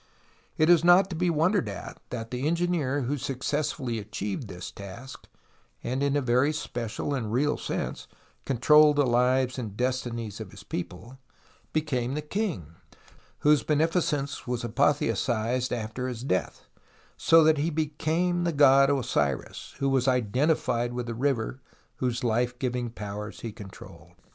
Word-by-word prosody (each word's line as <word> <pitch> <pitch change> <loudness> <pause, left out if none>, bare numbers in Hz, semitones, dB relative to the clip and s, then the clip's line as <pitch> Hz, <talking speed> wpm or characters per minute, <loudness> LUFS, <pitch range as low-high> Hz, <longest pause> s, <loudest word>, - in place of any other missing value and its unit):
It 155 - +4
is 170 -2 +6
not 180 +3 +6
to - - -3
be 180 +2 +1
wondered 170 +5 +2
at - - -8
that 115 -2 -6
the 125 +3 -2
engineer 165 -5 0
who 135 +3 -2
successfully 135 -2 -2
achieved 105 +2 -4
this 90 -2 -7
task, 110 +7 -10 0.6
and 130 +3 -2
in 140 0 +1
a 145 - 0
very 130 +4 +3
special 120 -2 -4
and 115 -6 -2
real 145 +5 +2
sense - - -4 0.4
controlled 150 +4 +5
the 145 -1 +3
lives 125 +1 +2
and 105 -4 -6
destinies 120 -4 -2
of 105 - -7
his - - -13
people, 115 +9 -7 0.5
became 135 -5 -1
the 150 - -2
king, 150 - -3 0.7
whose 150 -2 +5
beneficence 150 -1 0
was 125 -1 -2
apotheosized 120 -1 +1
after 120 +2 -3
his 120 -2 -5
death, 95 - -2 0.5
so 165 0 +5
that 155 -1 +4
he 155 +3 +1
became 160 +3 0
the 170 - +1
god 140 -2 +6
Osiris, 75 - -1
who 140 0 0
was 135 -1 +2
identified 125 0 +1
with 125 0 -3
the 120 - -4
river, 130 0 -1 0.4
whose 125 -2 -2
life 120 +1 0
giving 125 -1 -2
powers 105 -1 -7
he 115 - -5
controlled. 100 -2 -12
130 Hz, 150 wpm, -27 LUFS, 115-150 Hz, 0.7 s, is